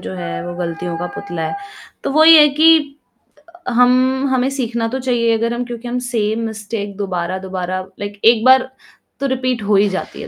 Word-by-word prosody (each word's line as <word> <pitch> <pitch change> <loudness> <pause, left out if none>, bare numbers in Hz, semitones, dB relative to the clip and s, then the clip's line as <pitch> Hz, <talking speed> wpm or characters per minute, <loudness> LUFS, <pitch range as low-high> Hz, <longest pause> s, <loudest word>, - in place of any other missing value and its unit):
जो 95 0 -7
है, 85 -2 -5
वो 175 - -6
गलतियों 170 -1 -4
का 175 - -3
पुतला 185 -5 -5
है। - - -5 0.5
तो - - -1
वही 315 +2 +7
है 300 -1 +7
कि 325 +1 +8 1.0
हम 255 +2 +2
हमें 260 +1 +1
सीखना 235 -3 -2
तो 260 +3 -4
चाहिए 235 -3 +1
अगर 230 +1 -1
हम 245 +1 -3
क्योंकि 240 0 -8
हम 245 +1 -3
सेम 220 -2 -1
मिस्टेक 210 -2 -6
दोबारा-दोबारा 185 -1 -4 0.2
लाइक 205 0 -7
1 225 -1 +5
बार 260 0 +5 0.5
तो 275 - -1
रिपीट 255 -2 -2
हो 205 0 +1
ही 200 +1 +4
जाती 190 - -6
है। - - -8
230 Hz, 185 wpm, -17 LUFS, 190-255 Hz, 1.0 s, कि